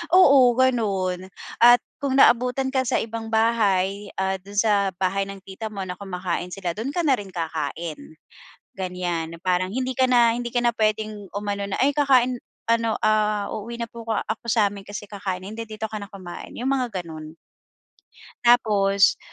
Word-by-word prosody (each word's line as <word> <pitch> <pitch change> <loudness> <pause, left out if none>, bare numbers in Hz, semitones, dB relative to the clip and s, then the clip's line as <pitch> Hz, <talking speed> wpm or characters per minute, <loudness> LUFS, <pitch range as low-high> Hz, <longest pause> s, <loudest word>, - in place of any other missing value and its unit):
oo, 275 -9 +7
ganun. 195 -8 +1 0.3
At 240 +1 +8 0.2
kung 275 -2 0
naabutan 250 +2 +4
ka 260 -1 +2
sa - - +1
ibang 225 0 -5
bahay, 205 -3 +2
ah, 190 0 0
doon 200 +2 -12
sa 200 -2 +3
bahay 195 +1 0
ng 195 -1 -9
tita 195 +3 -7
mo 195 -1 -4
na 180 -1 -6
kumakain 180 -3 -3
sila, 185 -3 -3
doon 235 +6 -3
ka 350 - +1
na 275 -3 +4
rin 205 - -7
kakain, 160 -1 -4 0.8
ganyan. 175 -3 -3
Na - - -16
parang 185 0 +1
hindi 260 +2 -2
ka 260 +1 +3
na 235 -2 +5
hindi 240 0 -4
ka 245 - +1
na 240 - +3
pwedeng 215 -2 -1
umano 205 0 -3
na, - - -2
"Ay 280 +2 +3
kakain 255 -4 +3 0.3
ano, 230 -1 +2
ah, 215 -1 +2
uuwi 235 +3 -6
na 235 - -2
po 230 0 -10
ko - - +1
ako 220 +3 -3
sa 215 -2 +4
amin 200 -1 -10
kasi 205 0 -7
kakain, 195 -3 -4
hindi 220 +3 -6
dito 215 0 -4
ka 215 - -4
na 200 - -6
kumain." 185 -4 -9
Iyong 250 +3 -2
mga 240 -8 -2
ganun. 155 0 -9 1.1
Tapos, 205 -5 +4
210 Hz, 180 wpm, -24 LUFS, 190-235 Hz, 1.1 s, At